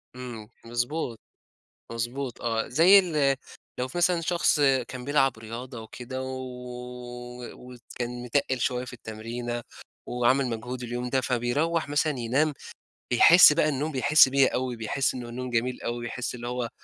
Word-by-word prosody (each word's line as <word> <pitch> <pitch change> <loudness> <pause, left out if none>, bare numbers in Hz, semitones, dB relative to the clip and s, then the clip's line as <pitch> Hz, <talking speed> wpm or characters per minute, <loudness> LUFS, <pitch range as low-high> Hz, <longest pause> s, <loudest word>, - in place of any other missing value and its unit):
إمم، 120 -4 -8 0.2
مضبوط، 120 0 -2 0.7
مضبوط، 120 +2 -4
آه. 115 -1 -1
زي 175 +9 +7
ال 150 -7 +2 0.4
لو 125 +1 -1
في 175 - -5
مثلًا 175 -1 +3
شخص 170 -2 +2 0.3
كان 125 -1 -7
بيلعب 135 -4 +2
رياضة 115 +2 -7
وكده، 130 +3 -7
و - - -5
و 125 -1 -8
و 125 0 -12 0.2
وكان 120 0 -4
متقّل 130 0 0
شوية 125 -4 0
في 125 - -10
التمرينة، 120 +1 -5 0.4
وعمل 125 +2 +2
مجهود 125 +2 -5
اليوم 120 +1 -4
ده، 130 - +2
فبيروَّح 140 +7 0
مثلًا 145 -1 0
ينام، 135 +6 +1 0.6
بيحس 165 +5 +8
بَقى 150 - +2
النوم 150 +3 -2
بيحس 145 +2 +6
بيه 135 0 +4
أوي، 125 -1 -2
بيحس 125 +5 -1
إن 125 -2 -6
النوم 125 +2 -6
جميل 125 +1 -1
أوي، 120 0 -3
بيحس 125 +1 -4
اللي 120 0 -7
هو 125 -1 -2
125 Hz, 155 wpm, -26 LUFS, 120-140 Hz, 0.7 s, بيحس